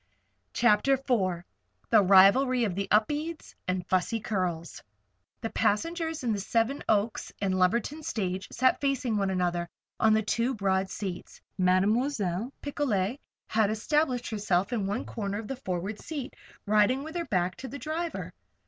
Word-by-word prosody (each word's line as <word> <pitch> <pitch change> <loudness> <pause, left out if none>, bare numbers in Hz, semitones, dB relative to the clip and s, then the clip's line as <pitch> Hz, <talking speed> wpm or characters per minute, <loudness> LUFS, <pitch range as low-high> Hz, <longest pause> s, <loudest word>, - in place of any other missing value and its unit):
CHAPTER 235 +3 +4
IV 205 -10 0 0.5
THE 220 -2 +7
RIVALRY 200 +7 +6
OF 200 - -1
THE 195 +2 -2
UPEDES 295 +10 0
AND 185 0 0
THE - - -20
FUSSY 190 +5 0
CURLS 180 -6 -3 0.6
The 225 - -3
passengers 320 - 0
in 235 -3 +1
the 205 - -2
Seven 230 +7 0
Oaks 215 +1 +1
and 190 -2 0
Lumberton 235 +11 +1
stage 195 - -3
sat 255 +1 +2
facing 270 -5 0
one 195 -1 +1
another 175 -2 -1 0.3
on 220 -1 +5
the 220 - +2
two 235 +4 0
broad 190 -2 0
seats. 190 -4 -6 0.2
Mademoiselle 200 +3 +1
Picolet 255 -5 -1 0.3
had 215 -2 +2
established 250 +3 0
herself 200 0 0
in 205 -5 -1
one 205 +5 -2
corner 200 -3 -4
of 215 0 -6
the 270 - -3
forward 195 -3 -4
seat, 290 -5 -6 0.3
riding 215 +6 +3
with 315 +3 -8
her 340 -1 -2
back 180 - 0
to 265 - -7
the 280 - -7
driver. 310 - -4
215 Hz, 155 wpm, -28 LUFS, 190-260 Hz, 0.6 s, THE